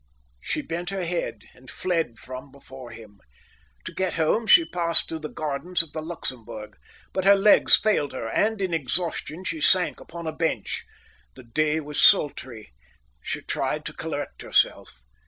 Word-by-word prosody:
She - - -3
bent 175 +2 -4
her 195 -2 -3
head 170 0 -3
and 130 +1 -16
fled 165 -10 -2
from 130 +3 -9
before 135 -2 -12
him. 110 -3 -13 0.7
To - - -6
get 190 -1 -1
home 170 +8 +1
she 335 - +7
passed 170 - +3
through 160 - -5
the 155 -1 -6
gardens 160 +4 -1
of 160 - -16
the 155 - -4
Luxembourg, 115 -9 -7 0.4
but 190 - -1
her 200 +1 +7
legs 200 +1 +6
failed 205 -10 +1
her, 120 -3 -4
and 210 - 0
in 185 -2 -1
exhaustion 165 +3 -1
she 160 -4 -3
sank 180 +3 +3
upon 170 0 -9
a 160 - -2
bench. 165 0 -2 0.5
The - - -12
day 150 +6 0
was 150 0 -2
sultry. 130 - +3 0.5
She - - -4
tried - - -2
to - - -5
collect - - -5
herself. - - +1
160 Hz, 165 wpm, -25 LUFS, 130-180 Hz, 0.7 s, she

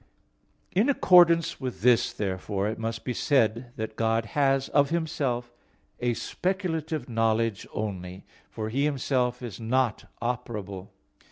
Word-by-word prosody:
In 210 +9 +2
accordance 170 - +5
with 130 -2 -4
this, 125 -1 +4
therefore, 100 0 -2
it 110 - -3
must 115 0 -4
be 125 - -1
said 120 -2 +1
that 110 0 -5
God 115 0 +1
has 135 -2 +2
of 140 -1 +3
Himself 140 -7 -2 0.5
a 120 -1 0
speculative 165 - -2
knowledge 115 -2 0
only; 95 -3 -5 0.2
for 110 -1 -4
He 135 +5 0
Himself 125 -3 0
is 115 -6 -6
not 120 0 0
operable. 105 -6 -4
120 Hz, 125 wpm, -27 LUFS, 110-140 Hz, 0.5 s, accordance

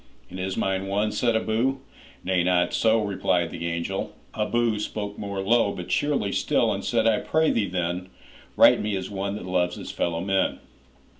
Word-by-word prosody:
''And 95 - -7
is 95 +1 -3
mine 95 0 -1
one?' 105 +2 0
said 120 0 +1
Abou. 115 +5 +1 0.5
'Nay, 90 -1 +1
not 90 -1 +2
so,'Replied 100 -6 +1
the 85 - -4
angel. 85 +3 -3 0.2
Abou 110 0 0
spoke 105 -1 -4
more 100 -1 -3
low, 105 +1 +3
But 90 0 -7
cheerly 140 -1 0
still, - - +1
and - - -4
said, 115 -2 +1
'I 110 -2 +3
pray 160 0 +2
thee, 105 -3 +1
then, 90 +1 -2 0.5
Write - - +7
me 105 -1 -1
as 95 +1 -4
one 100 0 -3
that 105 - -7
loves 90 -1 0
his - - -7
fellow 85 -1 -1
men. 95 +1 +1
100 Hz, 175 wpm, -25 LUFS, 90-110 Hz, 0.5 s, Write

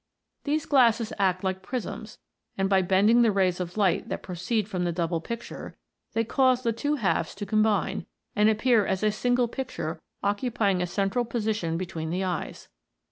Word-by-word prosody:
These 300 +1 0
glasses 235 -5 +3
act 185 -1 +1
like 190 0 -1
prisms, 220 0 -5 0.4
and 195 0 +1
by 195 -1 +4
bending 200 +6 +4
the 230 -2 +4
rays 185 -3 +1
of 180 +2 -5
light 200 -4 +1
that - - -4
proceed 185 +4 -2
from 185 -4 -2
the 175 - 0
double 170 -1 -1
picture, 235 +7 -7 0.4
they 225 - +1
cause 255 +2 +2
the 230 -2 +1
two 290 +6 -1
halves 185 - 0
to 205 - -5
combine, 215 +1 +1 0.3
and 210 0 +5
appear 220 0 +3
as 190 +1 -1
a 215 - +3
single 245 +3 +1
picture 225 - -5 0.2
occupying 205 -2 +1
a 180 - 0
central 195 +6 0
position 215 -8 -1
between 170 -3 -4
the 180 +3 -1
eyes. 180 -2 -4
205 Hz, 175 wpm, -27 LUFS, 185-235 Hz, 0.4 s, and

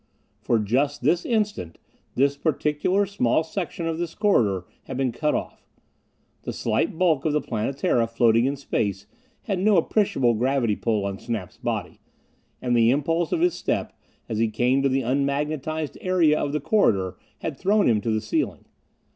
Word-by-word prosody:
For 120 - +2
just 130 +7 0
this 170 +6 +2
instant, 210 - -1 0.4
this 140 +2 +2
particular 155 +6 0
small 160 -7 +1
section 170 0 -4
of 165 0 -2
this 170 -1 -4
corridor 110 - +2 0.2
had 130 - -6
been 130 -2 0
cut 150 +6 0
off. - - -5 0.8
The - - -5
slight - - -1
bulk 165 -6 +2
of 155 - 0
the 150 - +3
Planetara, 120 0 0
floating 115 0 +3
in 140 +2 0
space, 100 -8 -2 0.4
had 195 -5 -2
no 205 +1 +4
appreciable 160 - +2
gravity 120 -1 +1
pull 110 -3 -1
on 100 0 -4
Snap's 110 -7 -5
body, - - -4 0.6
and 125 -1 +1
the 115 -1 +5
impulse 165 +6 +1
of 330 - 0
his 355 0 +3
step - - -2 0.3
as 110 -2 -3
he 115 - +3
came 125 +5 +1
to 140 - +2
the 135 +1 +1
unmagnetized 145 +3 -2
area 175 -5 +3
of 145 - -1
the 150 - -1
corridor 95 - +2 0.3
had 160 - -3
thrown 205 +2 +3
him 110 -3 +3
to 115 - -2
the 110 -1 0
ceiling. 315 - -2
140 Hz, 170 wpm, -24 LUFS, 115-165 Hz, 0.8 s, the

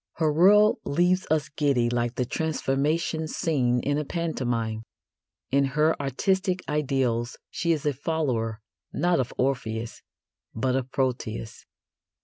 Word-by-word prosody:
Her 155 -2 +1
world 205 +6 +5
leaves 175 +5 +1
us 155 -2 +1
giddy 140 -5 +1
like 120 0 -1
the 125 - 0
transformation 160 +2 -1
scene 130 -7 +1
in 145 +3 0
a - - -1
pantomime. 120 -9 -2 0.7
In 140 +1 +4
her 155 +1 +4
artistic 185 - 0
ideals 130 -5 0
she 170 - 0
is 155 -3 -1
a 145 - +2
follower, 125 -7 -2 0.3
not 175 -2 +1
of 125 - -1
Orpheus, 120 -4 -2 0.5
but 130 +3 0
of 130 -1 -2
Proteus. 120 -4 -3
140 Hz, 125 wpm, -26 LUFS, 120-160 Hz, 0.7 s, world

